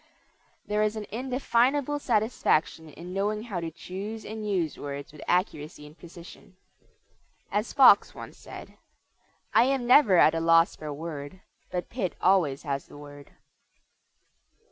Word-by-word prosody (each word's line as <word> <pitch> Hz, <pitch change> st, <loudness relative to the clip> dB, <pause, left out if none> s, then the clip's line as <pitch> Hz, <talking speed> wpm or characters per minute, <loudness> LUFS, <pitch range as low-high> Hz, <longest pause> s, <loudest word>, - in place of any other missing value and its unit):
There 210 Hz, 0 st, -1 dB
is 215 Hz, 0 st, 0 dB
an 215 Hz, -1 st, -5 dB
indefinable 260 Hz, +4 st, 0 dB
satisfaction 210 Hz, -, 0 dB
in 175 Hz, +4 st, -10 dB
knowing 210 Hz, +2 st, -1 dB
how 205 Hz, -7 st, -4 dB
to 165 Hz, -1 st, -4 dB
choose 195 Hz, +7 st, -8 dB
and 215 Hz, -1 st, -6 dB
use 175 Hz, -6 st, -1 dB
words 140 Hz, 0 st, -7 dB
with 150 Hz, -, -13 dB
accuracy 155 Hz, -4 st, -2 dB
and 150 Hz, +1 st, -14 dB
precision. 175 Hz, +2 st, -14 dB, 1.0 s
As 210 Hz, +3 st, -1 dB
Fox 275 Hz, -2 st, +6 dB
once -, -, -10 dB
said, -, -, -12 dB, 0.7 s
"I -, -, +5 dB
am 265 Hz, -2 st, 0 dB
never 240 Hz, -6 st, +6 dB
at 160 Hz, -, +6 dB
a 165 Hz, -, -1 dB
loss 165 Hz, +1 st, +4 dB
for 155 Hz, -, -9 dB
a -, -, -4 dB
word, 150 Hz, +3 st, -7 dB, 0.3 s
but 180 Hz, -1 st, -5 dB
Pitt 205 Hz, -8 st, -3 dB
always 170 Hz, -7 st, +2 dB
has 140 Hz, -3 st, -4 dB
the -, -, -14 dB
word." 145 Hz, -1 st, -12 dB
185 Hz, 145 wpm, -27 LUFS, 155-220 Hz, 1.0 s, Fox